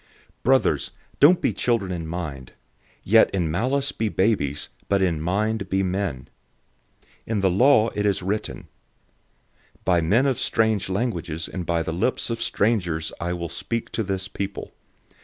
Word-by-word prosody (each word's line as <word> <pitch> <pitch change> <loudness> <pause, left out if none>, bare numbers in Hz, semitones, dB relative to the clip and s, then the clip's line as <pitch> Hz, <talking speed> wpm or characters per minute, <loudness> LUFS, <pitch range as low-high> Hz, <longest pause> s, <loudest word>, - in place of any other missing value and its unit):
014:020 - - -33 0.4
Brothers, 130 +1 +2 0.3
don't 170 +5 +6
be - - +1
children 100 -1 0
in 85 -3 -4
thoughts, 75 -7 -6 0.5
yet 110 +3 +5
in 85 -5 -1
malice 130 - 0
be 110 -1 -2
babies, 95 -10 0 0.2
but 100 - +3
in 85 -5 0
thoughts 105 +4 0
be 95 0 +1
mature. 95 -7 -2
014:021 - - -22 1.0
In 110 -3 0
the 95 -1 +3
law 115 +2 +5
it 105 0 0
is 95 -2 0
written, 105 +3 -3 1.2
"By 90 -2 +3
men 105 +11 +3
of 135 -3 +1
strange 110 -4 +1
languages 90 -7 -2
and 90 -3 -6
by 85 -1 +1
the 80 - -3
lips 115 +7 -1
of 115 - -3
strangers 90 -8 0
I 85 +1 -2
will 85 -1 -4
speak 115 -1 -4
to - - -1
this 95 -2 -2
people. 100 0 -6
95 Hz, 160 wpm, -24 LUFS, 85-110 Hz, 1.2 s, don't